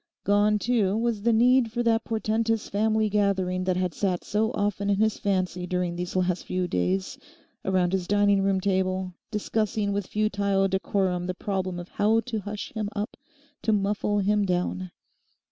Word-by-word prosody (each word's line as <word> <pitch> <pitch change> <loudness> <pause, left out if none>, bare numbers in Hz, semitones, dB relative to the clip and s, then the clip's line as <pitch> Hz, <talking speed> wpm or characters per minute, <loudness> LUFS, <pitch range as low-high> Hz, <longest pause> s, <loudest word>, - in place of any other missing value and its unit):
Gone, 205 +1 +3
too, 210 -3 +1
was 230 -2 0
the 235 +3 +3
need 240 +1 +4
for 240 +1 -1
that 230 -1 +2
portentous 225 0 0
family 220 +1 +1
gathering 190 -3 0
that 185 -1 +1
had 180 -2 -1
sat 185 -1 -1
so 215 +1 0
often 205 0 -1
in 200 - +3
his 220 +2 +1
fancy 185 -2 -1
during 180 -1 -1
these 180 +1 -4
last 180 -1 0
few 185 -1 -1
days 90 - -1 0.4
around 185 -1 +1
his 185 -2 -1
dining 205 0 +3
room 195 -1 +2
table, 185 -1 0 0.2
discussing 210 -1 -1
with 200 -2 -2
futile 200 -2 +1
decorum 190 -2 0
the 185 - -3
problem 190 -2 -2
of 175 - -8
how 220 +2 +2
to 230 -2 -4
hush 205 +1 -6
him 215 -3 -2
up, 210 +2 -3 0.5
to 220 - +1
muffle 205 0 +1
him 205 +1 +2
down. 185 0 -1
200 Hz, 170 wpm, -26 LUFS, 185-215 Hz, 0.5 s, need